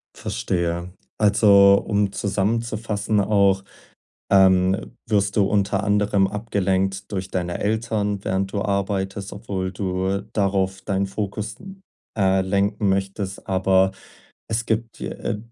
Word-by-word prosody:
Verstehe. 85 -1 -2 0.3
Also, 100 -2 +5
um 100 -2 +1
zusammenzufassen 105 +1 -1
auch, 100 -1 +3 0.7
ähm, 95 -1 +3
wirst 100 -2 +1
du 105 - +4
unter 100 -1 +1
anderem 105 -1 +2
abgelenkt 95 -2 -1
durch 95 -1 -3
deine 90 -1 -2
Eltern, 105 -2 -1
während 95 +1 -1
du 100 - -1
arbeitest, 100 0 -2
obwohl 100 -3 -4
du 95 0 -2
darauf 95 -2 0
deinen 100 -1 -1
Fokus, 105 +2 -4 0.6
äh, 95 -1 +3
lenken 100 +2 0
möchtest, 95 0 -2
aber 95 0 +3 0.6
es 115 +1 -1
gibt 115 +1 -2
dir - - -6
äh, 105 - -1
100 Hz, 115 wpm, -22 LUFS, 95-105 Hz, 0.7 s, Also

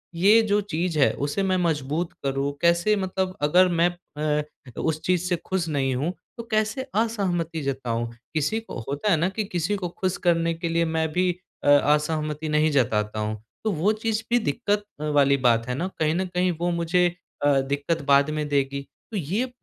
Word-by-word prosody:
ये 205 +6 +6
जो 205 +1 +4
चीज़ 175 -4 -2
है 135 - +5
उसे 145 +8 -2
मैं 185 -1 +1
मजबूत 160 -1 -1
करूँ, 135 +1 0
कैसे 170 +5 +3
मतलब 190 -1 -2
अगर 180 +5 +5
मैं 175 +1 +5 0.5
अ, - - -6 0.4
उस 155 -1 -1
चीज़ 180 -1 +2
से 175 - +2
खुश 185 -3 -1
नहीं 135 -3 0
हूँ 150 +8 -1 0.2
तो 235 - -5
कैसे 215 +5 0
असहमति 185 -8 0
जताऊँ? 120 -4 -2 0.2
किसी 160 +8 0
को 225 - -8
होता 145 +9 0
है 165 - +4
ना 175 +4 +1
कि 215 +2 -2
किसी 180 +2 -1
को 180 -3 -3
खुश 185 +2 -2
करने 165 -1 +3
के 165 +1 -4
लिए 170 0 +2
मैं 160 0 0
भी 180 +1 +2 0.3
अ - - +3 0.2
असहमति 150 0 -1
नहीं 150 +1 +3
जताता 110 -5 +1
हूँ। 105 0 -3 0.2
तो 220 - +1
वो 185 +5 +2
चीज़ 225 -1 0
भी 240 - +4
दिक़्क़त 210 -3 0 0.2
अ, - - -5
वाली 140 -2 +3
बात 115 0 +2
है 125 - -2
ना 175 +7 -2
कहीं 155 0 +2
न 190 - 0
कहीं 180 0 +1
वो 175 - +1
मुझे 170 +1 +2 0.4
अ, 140 -2 +4
दिक़्क़त 145 +4 -1
बाद 140 +1 +4
में 150 -1 -2
देगी। 140 -1 0 0.3
तो 210 - -3
ये 190 - -1
अ, 260 - -10
165 Hz, 200 wpm, -25 LUFS, 145-185 Hz, 0.5 s, ये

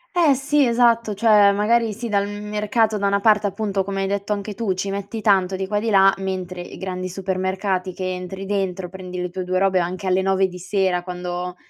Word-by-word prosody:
Eh, 325 -6 +4
sì, 285 +2 +2
esatto. 235 -2 +2
Cioè, 210 -1 +5
magari 225 +2 +2
sì, 230 +3 -5
dal 200 -2 +1
m 205 0 -7
mercato 210 +1 0
da 200 - +1
una 200 0 +2
parte 210 0 +3
appunto, 200 -1 -2
come 195 0 -3
hai - - -1
detto 200 +1 -3
anche 205 0 -2
tu, 200 -3 -2
ci 195 +2 -3
metti 200 +3 -5
tanto 195 -3 +2
di 190 0 -3
qua 205 +2 -2
e - - -5
di 230 - -1
là, 195 -2 +5
mentre 185 -2 -4
i 175 - -10
grandi 185 -1 -4
supermercati 190 0 -2
che 185 -1 -3
entri 185 +1 -6
dentro, 190 -2 -2
prendi 180 0 -7
le 180 0 -3
tue 185 +1 -4
2 185 +1 -1
robe 190 0 +3
anche 180 +2 -3
alle 185 0 +2
9:00 190 0 +2
di 180 -1 -10
sera 185 -1 0
quando 180 0 -5
195 Hz, 225 wpm, -22 LUFS, 185-210 Hz, -, Cioè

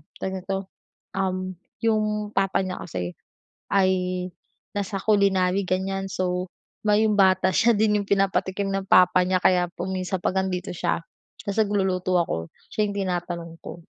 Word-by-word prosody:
tawag 190 0 -4
nito, 195 +1 -4 0.4
um, 185 -1 -1 0.3
yung 215 -2 +1
papa 195 -1 +1
niya 185 -1 -4
kasi 90 - -3 0.6
ay 190 -1 +4 0.9
nasa 200 0 -2
culinary 195 -2 +3
ganyan. 195 +1 -1
So 180 0 -1 0.4
may 210 +1 +4
yung 215 -1 +2
bata 190 -1 +4
siya 230 +6 +4
din 210 -1 +3
yung 200 - -8
pinapatikim 195 0 +1
ng 195 0 -2
papa 180 0 +6
niya 185 -1 +2
kaya 180 -1 +4
kung 185 +2 -4
minsan 185 0 -2
'pag 190 - 0
andito 185 -1 -3
siya 170 -1 0 0.4
tas 200 0 -3
nagluluto 190 -3 +1
ako, 80 - -2 0.2
siya 210 -1 +1
yung 200 - -5
tinatanong 175 -3 -3
ko. 170 - -8
190 Hz, 150 wpm, -25 LUFS, 185-200 Hz, 0.9 s, papa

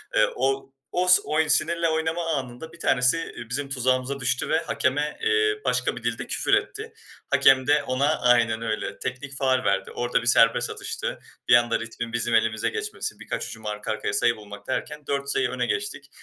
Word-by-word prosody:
Eee, - - +5
o 135 +1 -1 0.2
os 180 0 +4
oy 155 0 0
sinirle 165 +3 +2
oynama 160 +2 -1
anında 135 +5 -6
bir 170 - -15
tanesi, 125 +2 +3
eee, 120 -7 -7
bizim 140 +3 -3
tuzağımıza 130 +1 0
düştü 125 -1 -1
ve 160 - +3
hakeme, 145 +3 -1
eee, 105 0 +2
başka 125 0 0
bir 125 - -9
dilde 120 -1 -2
küfür - - -1
etti. - - -1 0.4
Hakem 130 0 +5
de 145 0 +4
ona, 140 +3 +1
aynen 115 -2 +3
öyle, 110 -2 -3
teknik 135 +2 -5
faul 130 -2 +1
verdi. 100 - 0
Orada 120 0 0
bir 120 - -6
serbest 115 -1 +4
atıştı. - - -5 0.3
Bir - - +8
anda 120 -1 +3
ritmin 115 0 -6
bizim 120 0 0
elimize 110 0 +1
geçmesi, 425 -1 -5
birkaç - - -4
hücum 110 -1 -10
arka 105 0 -3
arkaya 110 - -2
sayı 120 +3 +2
bulmak 105 -1 -11
derken 150 +2 -4
4 140 0 -2
sayı 130 -2 +1
öne 125 0 -1
geçtik. 420 -1 -3
130 Hz, 185 wpm, -25 LUFS, 115-145 Hz, 0.4 s, Bir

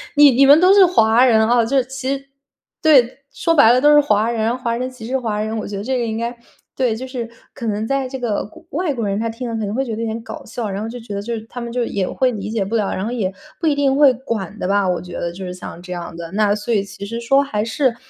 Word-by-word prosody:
你 290 -1 +8
你 265 +3 +5
们 285 +3 +8
都 370 +2 +6
是 395 -2 +7
华 235 -8 +4
人 220 -3 +4
哦， 240 -1 +4
就 275 +4 0
是 260 - +2
其 265 +1 -3
实 275 - -9 0.6
对， 270 -5 +4
说 330 - +1
白 280 -7 +7
了 250 - +3
都 295 +1 +6
是 295 - +7
华 215 -5 +1
人， 230 +1 0
华 235 -2 -2
人 255 +1 -3
歧 250 -3 -11
视 260 +2 0
华 220 -4 -2
人， 220 +1 -3
我 215 - -4
觉 200 - -5
得 200 - -5
这 260 +3 -1
个 240 - -1
应 220 -1 -3
该 235 +1 -3 0.4
对， 250 -4 +1
就 250 +4 -6
是 245 -3 -5 0.2
可 235 - -7
能 210 0 -1
在 275 0 0
这 265 +1 -6
个 230 -4 -2
国 330 +11 -15
外 325 0 -1
国 230 -5 -3
人， 200 +1 -1
他 230 +1 -1
听 235 +2 -5
了 230 - -3
可 220 - -2
能 200 - -4
会 265 - 0
觉 230 -4 -4
得 225 - -5
有 - - -1
点 225 +1 -4
搞 - - -8
笑， 230 -1 -5
然 195 +1 -4
后 - - -4
就 245 +1 -7
觉 225 -3 -8
得， 200 - -3
就 235 +3 -4
是 220 - -5
他 245 - -7
们 235 -1 -5
就 245 0 -1
也 195 -4 -2
会 260 -1 +1
理 210 -3 -5
解 220 -3 0
不 215 +4 -3
了， 210 -3 0
然 190 - -3
后 230 - -3
也 205 -6 -2 0.3
不 330 - -3
一 305 - +4
定 275 -2 +2
会 285 -3 +6
管 220 -5 -5
的 - - -2
吧， 200 0 +2
我 180 -1 0
觉 180 0 -10
得 170 - -3
就 190 +2 -8
是 180 - -5
像 180 -1 -9
这 180 0 -10
样 175 -1 -7
的。 165 0 -8
那 205 0 +2
所 210 +3 -3
以 205 -3 +2
其 200 0 -9
实 230 +3 -5
说 270 +4 +3
还 210 -7 -2
是 235 +1 0
230 Hz, 330 characters per minute, -19 LUFS, 210-260 Hz, 0.6 s, 你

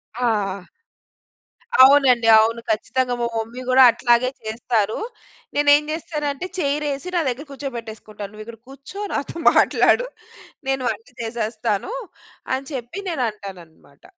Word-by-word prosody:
ఆ! 205 -6 -1 1.2
అవునండి. 260 -3 +6
అవును. 230 +2 +2
ఖచ్చితంగా 245 +3 -1
మా 235 - +1
మమ్మీ 230 +3 -5
గూడా 260 +1 +7
అట్లాగే 240 +1 +2
చేస్తారు. 220 -1 -1 0.6
నేనేం 290 0 +5
చేస్తానంటే, 305 -1 -4
చెయిర్ఎసి 290 +1 -2
నా 345 - +3
దగ్గర 260 +5 -5
కూర్చోబెట్టేసుకుంటాను. 225 -6 -7
నువ్వు 215 0 -10
ఇక్కడ 230 -1 -11
కూర్చో. 275 +9 -11
నాతో 280 - -3 0.2
మాట్లాడు. - - +3 0.6
నేను 270 -1 0
వంట 225 +1 -7 0.2
చేసేస్తానూ 225 - -3 0.6
అని 265 +1 -4
చెప్పి 255 +6 -6
నేనంటాననమాట. 195 - -6
240 Hz, 110 wpm, -21 LUFS, 220-275 Hz, 1.2 s, గూడా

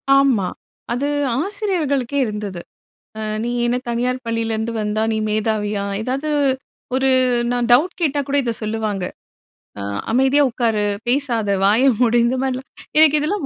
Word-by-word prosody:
ஆமா. 260 -9 +3 0.5
அது 275 +4 -1 0.3
ஆசிரியர்களுக்கே 305 - 0
இருந்தது. 210 -4 -5 0.6
அ - - -4 0.2
"நீ - - -2 0.2
என்ன 240 +1 +1
தனியார் 250 +2 -1
பள்ளியில 230 -1 -1
இருந்து 220 +1 -2
வந்தா 210 +1 -1
நீ - - 0
மேதாவியா?", 210 -1 -1 0.2
ஏதாவது 270 +5 -2 0.7
ஒரு 265 0 +2 0.4
நான் 245 -1 0
டவுட் 320 +11 +3
கேட்டா 290 -2 +1
கூட 280 - +1
இதை 235 -2 -1
சொல்லுவாங்க. 215 -3 -2 0.8
அ - - -4 0.3
"அமைதியா 265 +3 +4
உட்காரு, 225 -3 0 0.2
பேசாத 235 -7 +1
வாய 215 +6 +4 0.2
மூடு" 240 -1 +3
இந்த 255 +2 +1
மாதிரிலாம். 260 0 -3 0.3
எனக்கு 305 -1 +6
இதெல்லாம் 355 +2 -1
245 Hz, 140 wpm, -20 LUFS, 220-275 Hz, 0.8 s, எனக்கு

